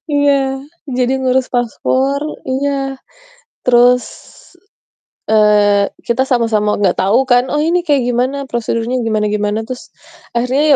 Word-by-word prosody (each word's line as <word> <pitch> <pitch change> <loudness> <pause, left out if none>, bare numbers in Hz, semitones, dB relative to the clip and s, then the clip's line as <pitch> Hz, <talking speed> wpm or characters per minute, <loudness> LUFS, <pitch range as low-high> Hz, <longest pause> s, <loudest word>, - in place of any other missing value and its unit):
iya, 275 -2 +1 0.4
jadi 250 0 +1
ngurus 260 0 +1
paspor 260 +3 0 0.3
iya, 270 0 -2 0.6
terus, 250 0 +4 1.2
eee, 210 -2 +4 0.2
kita 240 +2 +1
sama-sama 225 -4 +1
nggak 190 -3 +2
tahu 200 +6 +3
kan, 245 0 +5
"Oh, 295 - +1
ini 340 +3 +1
kayak 285 -3 +3
gimana 250 +3 0
prosedurnya, 235 +1 -2
gimana 215 -1 0
gimana." 210 0 -1
Terus, 255 +6 -8 0.5
akhirnya 250 +4 +1
245 Hz, 115 wpm, -15 LUFS, 220-270 Hz, 1.2 s, kan